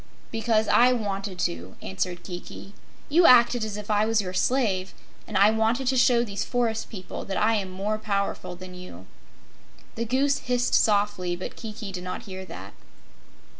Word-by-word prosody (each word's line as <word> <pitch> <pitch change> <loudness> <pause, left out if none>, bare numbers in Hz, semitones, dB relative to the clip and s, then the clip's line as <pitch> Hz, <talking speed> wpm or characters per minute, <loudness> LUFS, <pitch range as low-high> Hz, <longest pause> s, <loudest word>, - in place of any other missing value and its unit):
"Because 225 -1 +1
I 250 +1 +5
wanted 200 -4 -3
to," 85 +3 -3
answered 175 - -4
Kiki. 180 +2 -9 0.3
"You 335 +4 +5
acted 240 -1 +6
as 215 -1 -4
if 210 0 -5
I 210 0 +3
was 225 -1 +2
your 185 -3 -3
slave, 195 -4 0 0.3
and - - -2
I 200 +2 +6
wanted 225 +4 +1
to 265 - +1
show 245 -1 +4
these 200 -3 -3
forest 230 -2 -1
people 190 -4 -7
that 195 - -3
I 220 +2 +3
am 200 -4 -1
more 200 +3 -2
powerful 200 -4 -2
than 185 +1 -10
you." 180 - -11 0.9
The 230 - -3
Goose 270 +4 +1
hissed 245 0 0
softly, 205 -4 +2
but 180 - -7
Kiki 215 -3 -7
did 180 -1 -6
not 185 - -5
hear 190 -3 -8
that. - - -10
210 Hz, 170 wpm, -26 LUFS, 185-235 Hz, 0.9 s, acted